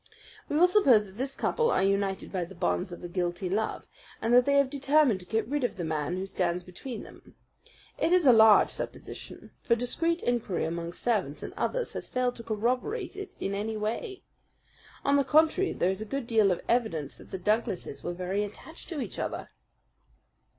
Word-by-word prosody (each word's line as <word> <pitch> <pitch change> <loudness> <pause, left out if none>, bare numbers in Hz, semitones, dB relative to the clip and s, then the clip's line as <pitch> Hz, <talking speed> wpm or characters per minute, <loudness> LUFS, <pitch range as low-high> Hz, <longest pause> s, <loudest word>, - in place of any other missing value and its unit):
"We - - -1
will 345 - +7
suppose 280 - +5
that 190 0 -14
this 270 +1 -2
couple 470 0 +1
are - - +2
united 195 0 0
by 185 -3 -1
the 190 +3 -13
bonds 90 - -1
of 175 - -9
a - - -4
guilty 175 0 -2
love, 215 +3 -1 0.3
and 230 - 0
that 245 0 +7
they 280 - +3
have 280 -2 +3
determined 280 -5 +3
to 180 - -11
get 220 +3 0
rid 290 +1 -1
of 245 - -1
the 175 - -3
man 155 +2 -2
who 190 - -3
stands 180 -2 -1
between 215 +7 -7
them. - - -15 0.6
It 330 - +2
is 360 -3 +4
a 255 - +8
large 220 -2 +7
supposition; - - -7
for 235 - +2
discreet 330 +8 0
inquiry 230 -9 0
among 170 +1 -4
servants 190 -9 -1
and - - -6
others - - -2
has - - -5
failed 250 -1 0
to 230 - -8
corroborate 250 - -1
it 395 0 -7
in 195 - -2
any 215 +2 -2
way. 235 - -4 0.8
On 280 0 +4
the 280 - +3
contrary, 320 +6 +3
there 180 - +1
is 190 +2 -4
a - - -3
good 275 +3 -3
deal 220 -4 +3
of 180 - -1
evidence 175 - 0
that - - -15
the 190 - -4
Douglases 205 -4 -1
were 175 - -3
very 185 +3 -1
attached 215 +10 -9
to 320 -5 -3
each 225 - -6
other." - - -4
220 Hz, 200 wpm, -28 LUFS, 185-275 Hz, 0.8 s, a